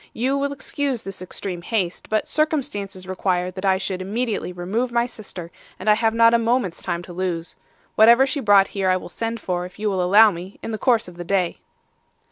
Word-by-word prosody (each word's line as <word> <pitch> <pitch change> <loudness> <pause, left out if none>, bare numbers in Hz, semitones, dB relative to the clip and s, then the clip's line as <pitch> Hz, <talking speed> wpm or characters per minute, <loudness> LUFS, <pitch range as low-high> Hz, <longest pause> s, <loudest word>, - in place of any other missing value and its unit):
You 260 +4 0
will 280 0 -1
excuse 275 -2 -3
this 195 -1 -7
extreme 185 -1 -5
haste, 185 -3 -2
but 215 0 0
circumstances 230 - -2
require 185 -1 -1
that 185 +2 -6
I 190 -1 +4
should 190 -1 -3
immediately 215 +1 -2
remove 195 +8 -2
my 235 0 +2
sister, 195 -7 -8 0.3
and 185 - -9
I 210 - +7
have 225 +1 +1
not 230 0 +6
a 235 - +5
moment's 230 -6 0
time 175 -1 -3
to 175 - -10
lose. 175 -2 -3 0.4
Whatever 235 +4 +6
she 275 +2 -2
brought 205 -5 +5
here 195 -2 -1
I 185 - +3
will 185 - -9
send 230 +5 -4
for, 180 -3 -2
if 180 0 -10
you 210 0 -1
will 190 -1 0
allow 205 +4 +6
me, 180 +2 -9
in - - -4
the 220 - -4
course 240 -7 +2
of 175 -1 -12
the 175 - -5
day. 185 -1 0
200 Hz, 215 wpm, -22 LUFS, 185-230 Hz, 0.4 s, I